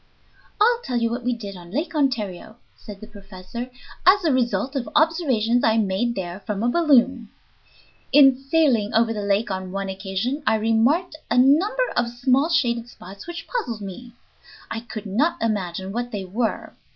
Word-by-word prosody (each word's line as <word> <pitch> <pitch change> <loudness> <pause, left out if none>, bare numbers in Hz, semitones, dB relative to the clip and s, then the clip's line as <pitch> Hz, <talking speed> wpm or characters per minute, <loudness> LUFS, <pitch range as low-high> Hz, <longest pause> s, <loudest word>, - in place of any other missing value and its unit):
"I'll 470 +3 +4
tell 250 - -2
you 230 -1 0
what 245 +1 -4
we 250 - 0
did 210 -5 -6
on 175 -1 -12
Lake 310 - -3
Ontario," 220 - -2 0.2
said 205 -3 -11
the - - -8
professor, 205 +3 -9 0.3
"as 380 +2 +5
a 310 - +3
result 255 +2 0
of 260 -3 -3
observations 260 -8 +2
I 225 0 +3
made 220 +3 0
there 180 -1 -5
from 205 +1 -4
a 240 - +2
balloon. 265 -8 +3 0.8
In 270 -2 +7
sailing 270 -6 +1
over 225 0 +3
the 210 - -4
lake 200 +2 0
on 190 -1 -4
one 195 0 -3
occasion 195 +8 -3
I 220 - +4
remarked 235 +11 +1
a - - +1
number 330 - +4
of 240 -1 +1
small 255 +5 +1
shaded 235 -7 0
spots 195 - -12
which 345 -1 -7
puzzled 245 - -3
me. 220 +5 -9 0.6
I 225 - -2
could 225 -2 -8
not 295 - 0
imagine 190 -4 -2
what 240 +3 -3
they 205 -4 -5
were. 220 +5 -3
235 Hz, 175 wpm, -23 LUFS, 205-275 Hz, 0.8 s, In